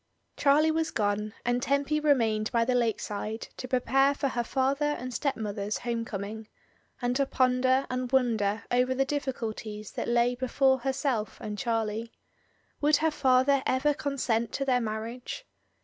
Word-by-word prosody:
Charlie 300 +3 +4
was 320 0 0
gone, 210 0 -1
and 245 +1 +1
Tempy 280 +3 +1
remained 230 -8 +2
by 230 -2 +2
the 255 - +1
lake 235 -3 +1
side 215 +2 -5
to 255 - -5
prepare 270 +2 +2
for 275 - -1
her 240 -2 -1
father 275 +4 +1
and 255 0 -6
stepmother's 210 -7 -2
home 235 -1 -3
coming, 215 +1 -6 0.6
and 245 0 +1
to 275 -1 +1
ponder 255 +1 +2
and 255 -1 -3
wonder 225 -6 +1
over 250 +1 +2
the 270 +1 +2
difficulties 225 -7 -4
that - - -4
lay 240 +1 +3
before 265 +1 +2
herself 265 -4 -1
and 210 -1 -5
Charlie. 225 -1 -1 0.7
Would 300 +1 +5
her 320 +2 +2
father 265 -1 +3
ever 270 +3 +2
consent 255 -6 -1
to 275 - -1
their 250 -2 +2
marriage? 230 - -5
250 Hz, 155 wpm, -28 LUFS, 225-275 Hz, 0.7 s, Would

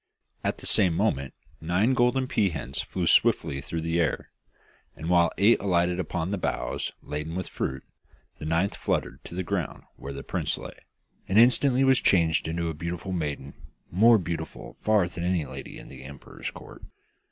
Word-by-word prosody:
At - - -1
the - - -10
same 90 -4 +3
moment 70 -4 0 0.3
nine 90 +10 +2
golden 125 +1 +2
pea 105 -6 +2
hens 65 -5 -4
flew 90 -2 -3
swiftly 80 -9 +3
through 80 +3 -4
the 80 +1 0
air, 80 -5 -1 0.6
and 80 +2 -5
while 85 -1 +5
eight 110 +4 +5
alighted 90 -2 +1
upon 90 -1 -2
the 100 - -1
boughs - - -2
laden 75 +3 -4
with 95 -1 -3
fruit, 65 0 -4 0.6
the - - -6
ninth 85 +5 +1
fluttered 65 - -2
to - - -8
the 95 - -2
ground 90 -1 -3
where 70 - -7
the 70 0 -7
prince - - -1
lay, - - -8 0.5
and 95 - +1
instantly 125 +3 +5
was 135 -1 +4
changed 80 -4 +3
into 85 +1 -2
a 80 - -2
beautiful 85 +4 -5
maiden, 75 -5 -3 0.4
more 115 +6 +6
beautiful 85 -4 -5
far 105 -4 +2
than 85 -1 -5
any 90 -3 +1
lady 65 0 -8
in - - -11
the - - -11
emperor's 70 0 -8
court. - - -12
85 Hz, 175 wpm, -27 LUFS, 80-100 Hz, 0.6 s, more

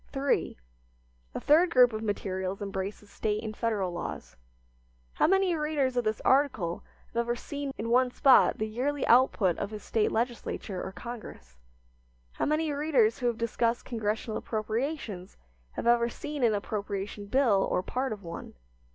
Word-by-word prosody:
III. 275 0 0 0.8
A - - -1
third 330 +5 +4
group 250 -6 +5
of 215 - -3
materials 190 -3 -3
embraces 200 +1 -5
State 215 0 -2
and 215 -1 -5
Federal 210 -6 -1
laws. 175 - -6 0.8
How - - +3
many 385 0 +3
readers 300 -4 0
of 245 - +1
this 215 -1 -1
article 260 -11 +2 0.3
have - - -6
ever 235 0 +1
seen 285 +3 -5
in 225 - -4
one 250 +1 +4
spot 265 +1 +5
the 215 - -1
yearly 260 +6 -1
output 230 -7 +4
of 200 - -2
his 210 -1 -8
State 220 -2 +1
legislature 230 -4 -3
or - - -5
Congress? 210 - -9 0.8
How - - -2
many 305 +1 +1
readers 280 -7 +2
who 245 - 0
have 235 -2 0
discussed 230 0 0
Congressional 220 -1 -2
appropriations 220 - -3 0.4
have - - -5
ever 235 0 +4
seen 295 +2 -5
an 225 -3 +4
appropriation 200 0 -4
bill 225 -4 +3
or 180 - 0
part 260 +4 -2
of 205 -2 -6
one? 170 -1 -8
230 Hz, 160 wpm, -29 LUFS, 205-265 Hz, 0.8 s, group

